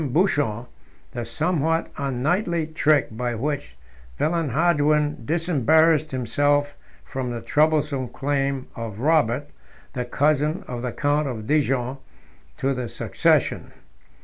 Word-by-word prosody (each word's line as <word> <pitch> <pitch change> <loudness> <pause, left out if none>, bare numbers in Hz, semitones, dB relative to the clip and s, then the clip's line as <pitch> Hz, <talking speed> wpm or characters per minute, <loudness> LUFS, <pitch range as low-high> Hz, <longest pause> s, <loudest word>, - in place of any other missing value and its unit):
Buchon, 145 - +1 0.5
the 120 - -4
somewhat 160 +6 0
unknightly 155 - 0
trick 150 -7 +2
by 120 0 -2
which 145 +4 -3 0.4
Villehardouin 150 -3 +1
disembarrassed 160 -1 +3
himself 145 +3 +1 0.3
from 130 -2 -4
the 120 -1 -4
troublesome 150 +1 +1
claim 140 0 -1
of 115 -3 -6
Robert, 145 -1 +2 0.4
the 125 -2 -2
cousin 150 - +1
of 120 -1 -5
the 125 -1 -3
count 145 +3 0
of 110 -5 -5
Dijon. 135 -2 +1 0.6
to 135 +1 0
the 125 -3 -4
succession. - - 0
145 Hz, 110 wpm, -23 LUFS, 125-155 Hz, 0.6 s, disembarrassed